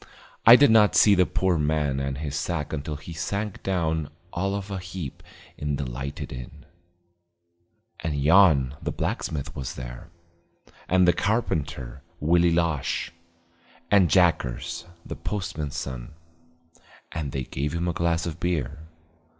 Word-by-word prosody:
I 115 - +12
did 140 -2 +6
not 105 -2 +5
see 105 - +7
the 90 -2 +4
poor 95 -1 +1
old - - 0
man 75 -2 0
and 70 -1 -2
his 75 -1 -4
sack 75 0 -2
until 75 0 -3
he 75 +4 -9
sank 100 +6 -3
down 80 -5 -1 0.2
all 95 +3 -1
of 100 0 -5
a 95 - -3
heap 90 -5 -7 0.4
in 75 -1 -1
the 70 - -3
lighted 65 +4 -5
inn. 65 +4 -9 1.3
And 80 -2 -2
Yon 75 -4 +5
the - - -2
blacksmith 70 -3 -3
was 65 -2 -5
there; 60 +7 -8 0.8
and 90 0 +4
the 90 - +6
carpenter, 75 - -2 0.2
Willie 85 +3 +4
Losh; 85 -4 0 0.8
and 95 -4 +5
Jackers, 85 -9 +1 0.2
the - - -6
postman's 80 -8 -4
son. 65 +2 -6 1.0
And 75 -3 -4
they 65 -1 -2
gave 70 +4 -3
him 85 +1 -1
a 85 - 0
glass 85 0 0
of 85 -1 -5
beer. 80 -5 -2
80 Hz, 145 wpm, -25 LUFS, 70-90 Hz, 1.3 s, I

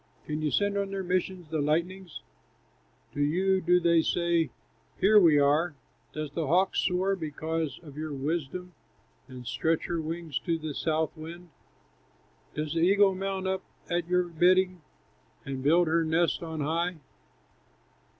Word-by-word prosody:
Can 150 +1 -3
you 155 - +1
send 200 +4 +1
on 200 -1 -2
their 195 -1 -3
missions 180 -2 -2
the 155 -2 0
lightnings; 170 +4 -2 0.9
To 145 - -2
you 185 +6 +2
do 180 +1 +4
they 170 -1 +4
say, 170 -2 +1 0.5
'Here 210 +2 +6
we 165 -6 +6
are'? 145 +3 +3 0.4
"Does 155 -1 -5
the 165 -4 -2
hawk 180 +6 +2
soar 190 +1 +1
because 160 -3 -3
of 145 -3 -12
your 155 0 -4
wisdom, 160 +5 -3 0.5
And 130 -2 -10
stretch 160 +8 0
her 170 -2 -2
wings 160 -2 -4
to 170 -2 -1
the 155 -2 -5
south 160 +2 -1
wind? 170 +2 -9 1.1
Does 150 0 -2
the 165 - 0
eagle 195 +3 +5
mount 190 0 -3
up 190 0 -1 0.3
at 175 -1 0
your 180 0 +2
bidding, 180 +1 +2 0.6
And 135 -1 -4
build 165 +5 +4
her 165 +1 +2
nest 165 +2 +1
on 160 -2 -5
high? 170 +4 0
170 Hz, 150 wpm, -28 LUFS, 155-180 Hz, 1.1 s, Here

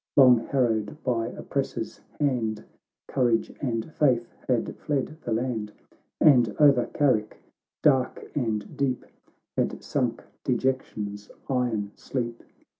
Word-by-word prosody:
Long 125 -4 +8
harrowed 115 -3 +1
by 115 -3 0
oppressor's - - -4 0.2
band, 120 -7 0 0.4
Courage 120 -4 +1
and 120 +2 -2
faith 125 -5 +2
had 125 -3 0
fled 145 0 -2
the 120 - -3
land, 110 -2 -1 0.5
And 120 -8 +5
over 140 -5 +6
Carrick, 115 -7 +1 0.5
dark 130 -3 +2
and 110 -6 -2
deep, 135 -3 -1 0.5
Had - - -1
sunk - - -1 0.2
dejection's 105 -6 -1 0.2
iron 120 -6 0
sleep. 120 -3 -4
125 Hz, 110 wpm, -26 LUFS, 110-135 Hz, 0.5 s, Long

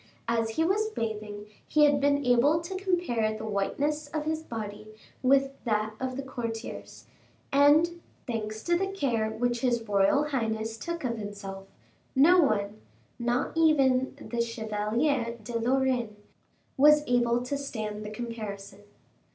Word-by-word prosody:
As 230 -1 +1
he 320 - +3
was 420 +5 +1
bathing 210 - -4 0.2
he 305 - +4
had 285 -1 +3
been 285 0 +2
able 250 +6 +4
to 340 +3 -6
compare 345 - 0
the 220 - -6
whiteness 285 +9 -1
of 300 +1 -4
his 315 0 -1
body 215 -6 -7 0.3
with 270 +1 +3
that 215 -2 0
of 260 0 -3
the 275 - -3
courtiers, 230 -3 -6 0.5
and, 310 +5 +4 0.2
thanks 220 -3 -4
to 345 - +2
the 385 +3 0
care 255 - -1
which 240 +2 -1
his 240 -2 +1
royal 205 +6 +3
highness 225 -4 -2
took 340 +5 -4
of 235 -3 -2
himself, 200 -2 -7 0.5
no 335 +7 +6
one, 215 -6 0 0.4
not 240 +2 0
even 270 -5 +3
the 235 -1 -3
Chevalier 230 +3 -1
de 230 +2 -3
Lorraine, 250 -2 +1 0.6
was 300 +2 +6
able 240 -1 +2
to 255 +3 -3
stand 215 -7 -4
the 210 - -6
comparison. 215 -3 -6
240 Hz, 145 wpm, -28 LUFS, 220-285 Hz, 0.6 s, no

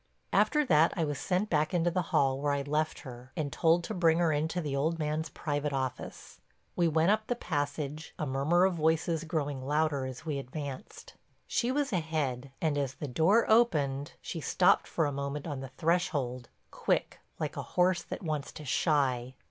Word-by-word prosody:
After 300 -1 +3
that 160 - +4
I 165 - +1
was 145 -2 -3
sent 185 +3 0
back 155 +3 +1
into 175 0 +2
the 180 +1 +1
hall 135 -1 +2
where 145 0 +1
I'd 140 0 -2
left 155 +2 -1
her 125 -1 -10
and 145 -3 -2
told 170 +1 +3
to - - -4
bring 165 -2 +3
her 170 -2 +3
into 155 +4 0
the 145 -5 -2
old 160 +4 0
man's 155 0 -2
private 145 -1 -2
office. 130 -2 -5 0.3
We 175 -1 +3
went 160 +3 +3
up 215 0 0
the 245 - 0
passage, 150 -4 -3
a 150 - -2
murmur 145 +7 +2
of 190 - +2
voices 160 0 +1
growing 145 -4 -2
louder 145 -1 0
as 130 +5 -8
we 150 -3 -2
advanced. 135 0 -7 0.3
She 240 +1 0
was 280 -3 0
ahead 150 -7 -1
and, 150 -3 +1
as 135 -2 -2
the 150 - -5
door 165 - +3
opened, 150 - +2
she 165 - -5
stopped 180 +4 +3
for 160 - 0
a 145 - 0
moment 140 +1 -4
on 145 -5 -4
the 135 0 -7
threshold, 145 -8 0 0.2
quick, - - -1 0.2
like - - -3
a - - -3 0.2
horse 180 0 +4
that - - -7
wants 155 -4 -3
to 150 - -9
shy. 130 -4 +1
155 Hz, 190 wpm, -30 LUFS, 140-170 Hz, 0.3 s, that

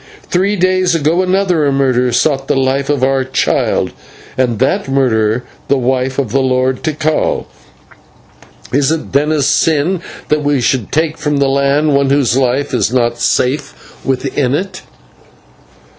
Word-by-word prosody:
Three 195 +3 +1
days 185 -1 +1
ago 165 +3 +1
another 185 -5 +1
murderer 130 -2 +1
sought 135 +2 0
the - - +1
life 135 +1 0
of 145 -3 0
our 135 0 +2
child, 130 0 0 0.4
and 125 -4 0
that 130 +3 0
murderer 120 -4 +1 0.2
the 140 - +2
wife 130 +1 -1
of 135 -6 -1
the 135 - +2
Lord 130 0 0
Tikal. 155 0 -1 1.3
Is 140 +2 +2
it, 160 -1 -3
then, 145 +3 +2
a 150 -2 +1
sin 160 +5 +1 0.3
that 150 0 +1
we 145 -1 +1
should 120 -2 -1
take 160 +1 0
from 150 -1 -1
the 140 0 +2
land 140 +2 +1
one 140 -1 +2
whose 140 -4 +2
life 135 +2 0
is 125 - +1
not 120 -2 0
safe 140 +3 0 0.3
within 135 0 -1
it." 185 +3 -4
140 Hz, 150 wpm, -14 LUFS, 130-155 Hz, 1.3 s, our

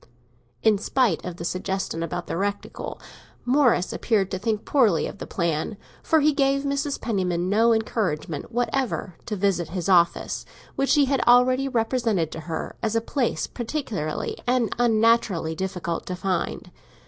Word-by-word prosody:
In 215 -3 +4
spite 230 -5 +1
of 180 -1 -5
the 170 - -5
suggestion 185 -1 -2
about 175 +1 -3
the - - -4
reticule, 200 +3 -3 0.5
Morris 250 -8 +3
appeared 200 -5 0
to 185 - -2
think 215 +1 -1
poorly 225 - +3
of - - -7
the - - -6
plan, 170 +3 -1 0.2
for 320 -1 +3
he 300 +1 +4
gave 275 0 +2
Mrs. 280 0 -1
Penniman 185 -5 -1
no 225 +3 +4
encouragement 195 -8 -1
whatever 245 -5 -1
to 215 - -2
visit 185 -4 0
his 180 -1 -3
office, 175 -2 +3 0.3
which 275 +3 +2
he 290 -1 +5
had 270 -1 +1
already 255 +2 +5
represented 225 - 0
to - - -6
her 160 - -4
as 225 -1 -1
a - - +4
place 245 +2 -1
peculiarly 225 - -4
and 245 -4 +2
unnaturally 225 -7 +3
difficult 175 -1 -3
to 180 - -3
find. 185 -1 -2
215 Hz, 155 wpm, -24 LUFS, 180-245 Hz, 0.5 s, he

